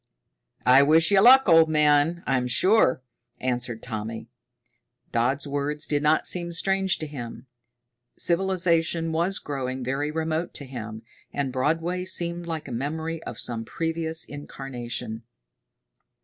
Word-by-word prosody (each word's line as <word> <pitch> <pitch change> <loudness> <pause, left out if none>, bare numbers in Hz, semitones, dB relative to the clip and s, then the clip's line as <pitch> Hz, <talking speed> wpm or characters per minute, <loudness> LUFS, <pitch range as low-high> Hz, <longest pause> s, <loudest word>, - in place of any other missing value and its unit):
"I 130 +2 +7
wish 160 +5 +4
you 195 -1 +6
luck, 260 +3 +7
old 165 -2 +6
man, 150 +2 +3
I'm 130 -2 +1
sure," 130 - +3 0.4
answered 120 -2 -2
Tommy. 110 0 -6 0.8
Dodd's 130 +5 0
words 145 +2 -2
did 145 -2 0
not 150 +1 +2
seem 175 -1 -2
strange 190 +2 +1
to 155 - -5
him. 130 -4 -8 0.7
Civilization 170 -2 +1
was 170 +4 0
growing 130 -2 -4
very 135 +4 -1
remote 160 +2 -2
to 140 - -6
him, 115 -4 -7 0.3
and 140 -3 -2
Broadway 165 +7 0
seemed 170 -1 -2
like 160 -3 -4
a - - -7
memory 160 +6 -3
of - - -6
some 115 -2 -2
previous 160 +4 -2
incarnation. 125 -5 -6
150 Hz, 130 wpm, -25 LUFS, 130-165 Hz, 0.8 s, I